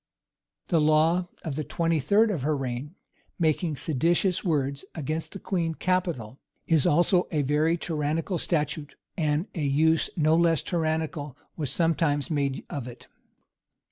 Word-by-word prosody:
The 165 -3 +3
law 160 +4 +3 0.2
of 155 -5 -3
the 155 - -2
twenty 165 +2 0
third 210 - +3
of 170 -9 -2
her 150 +2 0
reign, 135 +4 -4 0.4
making 160 -1 +1
seditious 170 +6 +1
words 140 -5 0
against 155 +1 -3
the - - -5
queen 170 -5 -1
capital, 170 - -1 0.3
is 160 -4 +3
also 175 +3 +3
a 150 -3 +1
very 150 +4 +2
tyrannical 160 +2 -2
statute; 150 -2 -2 0.2
and 155 0 0
a 165 - -4
use 155 +3 +2
no 155 0 +4
less 165 -2 +3
tyrannical 160 -4 -2 0.2
was 150 -5 -2
sometimes 165 0 +1
made 140 -3 -1
of 135 -4 -5
it. 120 - -11
155 Hz, 140 wpm, -27 LUFS, 145-170 Hz, 0.4 s, no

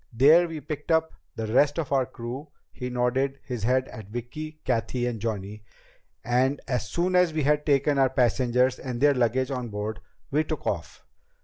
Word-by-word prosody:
There 150 +9 +6
we 165 -2 -6
picked 150 -1 -6
up 160 0 +2 0.2
the 110 - -3
rest 145 +3 +4
of 155 -5 -2
our 135 -2 +2
crew" 130 +3 -7 0.2
he 125 -1 -5
nodded 125 +2 0
his 125 -4 -4
head 130 +4 +2
at 110 -3 -9
Vicki, 155 +7 -6
Cathy, 120 0 0
and 120 -2 -2
Johnny 105 -1 -4 0.6
"and 130 +4 +2
as 125 -5 -1
soon 180 - 0
as 180 -3 +4
we 155 -1 0
had 150 +2 +2
taken 140 0 +3
our 135 -1 +4
passengers 125 0 +2
and 125 -2 -5
their 145 +2 +5
luggage 130 +1 +1
on 125 -3 -3
board, 105 +1 -4 0.3
we 150 +3 +2
took 155 -2 -5
off. 85 -5 -4
130 Hz, 185 wpm, -26 LUFS, 120-145 Hz, 0.6 s, There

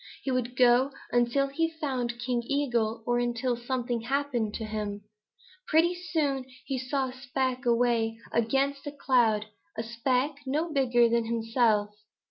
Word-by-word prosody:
He 270 - -1
would 250 -1 -1
go 250 +2 +5 0.2
until 240 +3 +2
he 325 +4 0
found 250 -6 -2
King 240 0 -1
Eagle 235 -6 0
or 240 0 +1
until 240 +1 0
something 240 -1 -2
happened 245 -4 -1
to 225 - -4
him. 210 -1 -4 0.6
Pretty 330 +3 +4
soon 310 -7 -1 0.2
he 270 -2 -2
saw 260 +1 -1
a - - -9
speck 260 -1 -2
way 235 -1 +2
up - - -19
against 275 +5 +1
a - - -3
cloud, 240 -7 +2 0.3
a 225 - -1
speck 250 +5 0
no 310 +4 -1
bigger 245 -4 +4
than 230 0 +1
himself. 225 -2 +1
245 Hz, 150 wpm, -28 LUFS, 235-275 Hz, 0.6 s, go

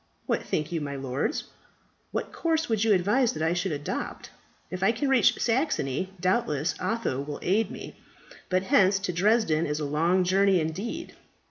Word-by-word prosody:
What - - 0
think 155 +1 -2
you, 165 -2 -2
my 140 -1 -4
lords? 135 - -2 0.7
What - - -4
course 320 -1 0
would 220 -2 +1
you 225 - +3
advise 210 +7 +3
that 155 - -3
I 165 +1 +2
should 180 +1 -1
adopt? 145 -1 -4 0.4
If 185 0 -5
I 195 - +4
can 255 +5 -1
reach 265 -3 +4
Saxony, 190 - 0
doubtless 185 - 0
Otho 185 - -1
will 145 0 -5
aid 210 +5 +2
me. - - -8 0.5
But 185 0 +1
hence 195 0 +4
to 195 -2 -3
Dresden 180 -4 +2
is 150 +1 -2
a 150 - -2
long 165 +6 +2
journey 190 +1 +3
indeed. 200 - -4
185 Hz, 170 wpm, -27 LUFS, 155-225 Hz, 0.7 s, I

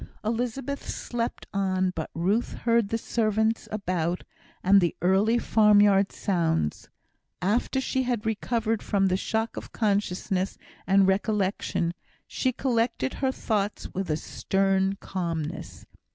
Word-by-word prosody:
Elizabeth 245 +5 -2
slept 235 -1 -3
on; 185 -2 +1
but 160 - -4
Ruth 195 +8 0
heard 230 -3 +1
the 225 - 0
servants 220 -1 0
about, 180 -4 -1 0.4
and 195 +1 +6
the 170 - +1
early 195 +6 +3
farmyard 205 -3 +4
sounds. 165 - -1 0.5
After 225 +8 +1
she 260 0 0
had 245 -4 -1
recovered 225 0 0
from 195 -1 +1
the 185 - +2
shock 220 +4 -2
of - - -7
consciousness 195 -3 0 0.3
and 195 0 +5
recollection, 190 -3 0 0.3
she 260 - -1
collected 230 - 0
her 265 -1 +2
thoughts 210 -5 -2
with 190 -1 -3
a 155 - +1
stern 195 +2 0
calmness. 170 -6 -4
200 Hz, 125 wpm, -26 LUFS, 185-225 Hz, 0.5 s, and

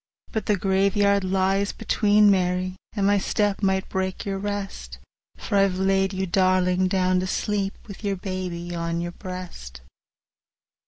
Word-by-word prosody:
20 - - -24
But 220 - -2
the 210 - +3
graveyard 200 +1 +2
lies 195 +1 +1
between, 210 -1 +3
Mary, 185 -1 0 0.2
And 200 -3 0
my 200 0 +4
step 205 +1 0
might 190 -1 +1
break 190 0 -3
your 195 -1 -2
rest— 205 -1 -5 0.4
For 205 - -1
I've 195 -2 +2
laid 195 0 +2
you, 190 0 -2
darling! 185 0 +2
down 185 -1 +2
to 185 - -2
sleep, 200 0 -1
With 200 0 -10
your 200 -1 0
baby 180 -2 -5
on 170 0 -2
your 175 0 -3
breast. 175 - -8
190 Hz, 155 wpm, -24 LUFS, 185-200 Hz, 0.4 s, my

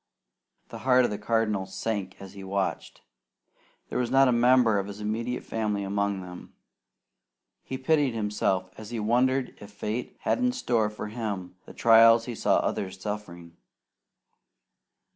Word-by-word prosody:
The - - -8
heart 130 -1 +4
of - - -2
the 105 - -4
Cardinal 105 -3 0
sank 100 0 -4
as 95 -1 -10
he 100 -1 -10
watched. 95 0 -3 0.9
There - - -2
was 120 -2 -1
not 135 +1 +5
a - - +3
member 120 -3 +4
of 100 - -4
his 100 0 -8
immediate 115 +4 -3
family 105 -3 -2
among 100 0 -1
them. 90 -1 -11 1.1
He 130 - -6
pitied 140 -2 +1
himself 105 -3 -1
as 110 -1 -9
he 120 -1 -4
wondered 125 +4 +1
if 100 - -11
fate 105 +3 -5
had - - 0
in 250 0 +1
store 115 - 0
for 105 0 -7
him 105 -6 -5
the - - -11
trials 115 0 +6
he 125 - -5
saw - - +2
others 95 -1 -2
suffering. 90 -5 -7
105 Hz, 155 wpm, -27 LUFS, 100-120 Hz, 1.1 s, trials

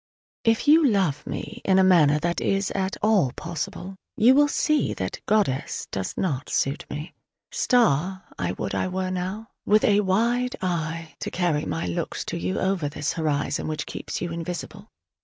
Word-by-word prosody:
If 225 +4 +2
you 315 +2 +7
love 185 - +1
me 235 +2 -6
in 190 -1 +3
a 190 - +6
manner 160 -6 +5
that 170 +1 -1
is 195 0 0
at 190 0 -2
all 205 - +3
possible, 175 +3 -5 0.2
you 240 +4 +6
will 290 +2 +5
see 305 +1 +1
that - - -4
"goddess" 200 -12 0
does 95 -1 -4
not 145 -7 -1
suit 135 +2 -1
me. 150 +3 -6 0.4
"Star" 190 - +2
I - - -2
would - - -4
I - - 0
were 185 0 -2
now, 190 +5 -4
with 215 +1 +3
a 205 -1 +4
wide 235 +6 +1
eye 165 -3 -3
to - - -3
carry 170 -4 0
my 165 - -2
looks 85 - -3
to - - -3
you 90 +2 -2
over 190 -6 0
this 145 0 -2
horizon 150 -3 -1
which 155 -1 -3
keeps - - -5
you 175 -1 -3
invisible. 175 +5 -6
185 Hz, 175 wpm, -25 LUFS, 155-210 Hz, 0.4 s, you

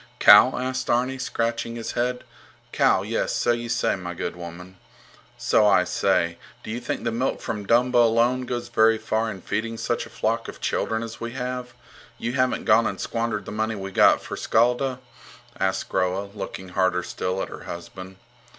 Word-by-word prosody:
Cow? 115 +5 +8
asked 130 0 -3
Arni, 130 +2 +1
scratching 115 -1 -2
his 115 -1 -4
head. 125 +1 -1 0.5
Cow? - - +3
Yes, - - -1
so 120 - +2
you 120 0 -2
say, 120 - +1
my 90 -2 -6
good - - -4
woman. 90 +2 -10 0.6
So 105 - +3
I 95 -3 +5
say? 85 -1 0 0.2
Do - - -6
you 115 - -3
think 125 - -4
the 115 - 0
milk 125 +4 -1
from 105 -2 -5
Dumba 120 +1 +4
alone 120 +2 +3
goes 120 0 -4
very 110 -1 +4
far 110 +1 -1
in 95 -4 -7
feeding 115 +2 -3
such - - -2
a - - -16
flock 115 +1 -1
of - - -9
children 110 0 -1
as 115 -1 -8
we 115 0 -4
have? 125 -1 -5 0.4
You 120 - -3
haven't 130 0 0
gone - - +5
and - - -4
squandered 115 -2 -2
the - - -7
money 110 +1 -1
we 95 -1 -6
got - - +5
for - - -6
Skjalda? 125 +3 +1 0.6
asked 95 0 0
Groa, 95 +2 -1
looking 95 -2 -7
harder 90 -1 +1
still 90 +1 -3
at - - -3
her - - -10
husband. 95 +2 -8
115 Hz, 185 wpm, -24 LUFS, 95-120 Hz, 0.6 s, Cow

